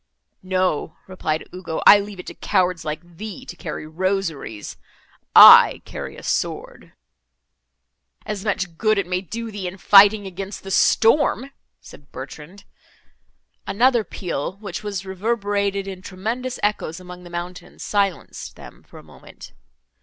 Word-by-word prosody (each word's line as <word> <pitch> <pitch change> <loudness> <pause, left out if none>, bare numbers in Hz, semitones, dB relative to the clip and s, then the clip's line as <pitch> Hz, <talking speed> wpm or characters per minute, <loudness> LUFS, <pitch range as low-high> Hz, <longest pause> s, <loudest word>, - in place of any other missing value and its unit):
"No," 185 -4 -1
replied 160 -4 -3
Ugo, 180 -3 -5
"I 205 - +9
leave 200 -1 -7
it - - -8
to - - -8
cowards 180 -2 0
like 155 +1 -5
thee, 220 +6 -8
to - - -9
carry 155 -3 -7
rosaries—I 165 - +4
carry - - -8
a - - -12
sword." - - -4 1.3
"And 210 -3 -5
much 195 -5 -3
good 215 -1 +2
may 180 +1 -1
it 185 - -15
do 230 0 -5
thee 200 -3 -5
in 180 +2 -7
fighting 205 +2 +6
against 195 +1 -7
the 195 - -7
storm!" 260 +6 +3 0.3
said 145 - -16
Bertrand. 150 +9 -10 1.0
Another 240 +2 +3
peal, 175 -5 -5
which 200 -4 -7
was 200 -3 -5
reverberated 200 0 -2
in 190 -1 -7
tremendous 225 +8 -5
echoes 205 -5 -1
among 180 0 -11
the 175 - -12
mountains, 175 +1 -8
silenced 200 -4 -2
them - - -14
for - - -17
a - - -13
moment. - - -15
190 Hz, 140 wpm, -21 LUFS, 180-205 Hz, 1.3 s, I